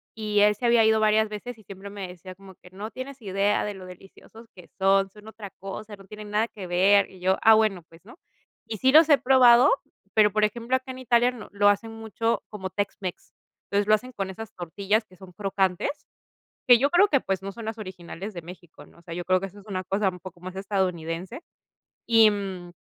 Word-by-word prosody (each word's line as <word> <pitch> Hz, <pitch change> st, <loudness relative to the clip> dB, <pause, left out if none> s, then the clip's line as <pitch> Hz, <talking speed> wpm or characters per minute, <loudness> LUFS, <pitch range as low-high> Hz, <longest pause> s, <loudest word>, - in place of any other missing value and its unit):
y 210 Hz, -1 st, -1 dB
él 210 Hz, 0 st, +5 dB
se 240 Hz, -, -5 dB
había 235 Hz, -1 st, +5 dB
ido 220 Hz, 0 st, +4 dB
varias 215 Hz, 0 st, +3 dB
veces 220 Hz, +3 st, -7 dB
y 220 Hz, -, -18 dB
siempre 195 Hz, 0 st, -10 dB
me 200 Hz, -2 st, -7 dB
decía 180 Hz, +1 st, -11 dB
como 190 Hz, 0 st, -15 dB
que: 180 Hz, -, -18 dB
"No 205 Hz, +4 st, -7 dB
tienes 260 Hz, +3 st, -8 dB
idea 200 Hz, 0 st, 0 dB
de 210 Hz, -, -4 dB
lo 190 Hz, -1 st, -10 dB
deliciosos 195 Hz, +5 st, -15 dB
que 180 Hz, -3 st, -15 dB
son, 195 Hz, 0 st, +3 dB
son 210 Hz, +1 st, -16 dB
otra 220 Hz, -2 st, -9 dB
cosa, 205 Hz, +3 st, -8 dB
no 195 Hz, -1 st, -17 dB
tienen 210 Hz, 0 st, -10 dB
nada 215 Hz, +2 st, +1 dB
que 200 Hz, -5 st, -9 dB
ver", 190 Hz, +3 st, +4 dB
y 185 Hz, -, -15 dB
yo: 185 Hz, +1 st, +1 dB
"Ah, 220 Hz, -, +7 dB
bueno, 215 Hz, -5 st, +1 dB
pues, 165 Hz, +2 st, -19 dB
¿no?". 235 Hz, +8 st, -15 dB, 0.5 s
Y 220 Hz, -, -5 dB
sí 260 Hz, +6 st, +3 dB
los 315 Hz, +2 st, +7 dB
he 290 Hz, -, +7 dB
probado, 255 Hz, 0 st, +6 dB, 0.4 s
pero 210 Hz, -1 st, +5 dB
por 215 Hz, +1 st, +1 dB
ejemplo, 235 Hz, +4 st, -2 dB
acá 260 Hz, 0 st, -4 dB
en 255 Hz, -, -9 dB
Italia 245 Hz, -1 st, +3 dB
no 245 Hz, -3 st, -11 dB
lo 205 Hz, 0 st, +2 dB
hacen 215 Hz, +3 st, 0 dB
mucho 225 Hz, +1 st, -2 dB
como 190 Hz, -3 st, -6 dB
tex-mex. 195 Hz, -2 st, -5 dB, 0.3 s
Entonces 200 Hz, 0 st, 0 dB
lo 215 Hz, -, +5 dB
hacen 250 Hz, +4 st, -7 dB
con 195 Hz, -4 st, -4 dB
esas 225 Hz, +3 st, -9 dB
tortillas 200 Hz, +5 st, -1 dB
que 185 Hz, -, -20 dB
son 190 Hz, -2 st, -13 dB
crocantes, 195 Hz, -, -2 dB, 0.6 s
que 245 Hz, -1 st, +8 dB
yo 280 Hz, +4 st, +1 dB
creo 370 Hz, +5 st, +5 dB
que, 280 Hz, -6 st, +2 dB
pues, 195 Hz, -4 st, -3 dB
no 195 Hz, -, -5 dB
son 230 Hz, +2 st, -9 dB
las 220 Hz, 0 st, -5 dB
originales 190 Hz, 0 st, -8 dB
de 175 Hz, -, -7 dB
México, 175 Hz, 0 st, -13 dB
¿no? -, -, -22 dB
O -, -, -19 dB
sea, 170 Hz, 0 st, -8 dB
yo 175 Hz, +1 st, -5 dB
creo 185 Hz, +1 st, +2 dB
que 195 Hz, -, -4 dB
eso 195 Hz, +2 st, -14 dB
es 200 Hz, -, -20 dB
una 190 Hz, -3 st, -4 dB
cosa 195 Hz, +2 st, 0 dB
un 180 Hz, -1 st, -12 dB
poco 180 Hz, -1 st, -11 dB
más 185 Hz, +1 st, -8 dB
estadounidense 190 Hz, -, -3 dB, 0.7 s
y, 225 Hz, -2 st, +6 dB
mm, 190 Hz, -4 st, -6 dB
205 Hz, 230 wpm, -25 LUFS, 190-225 Hz, 0.7 s, que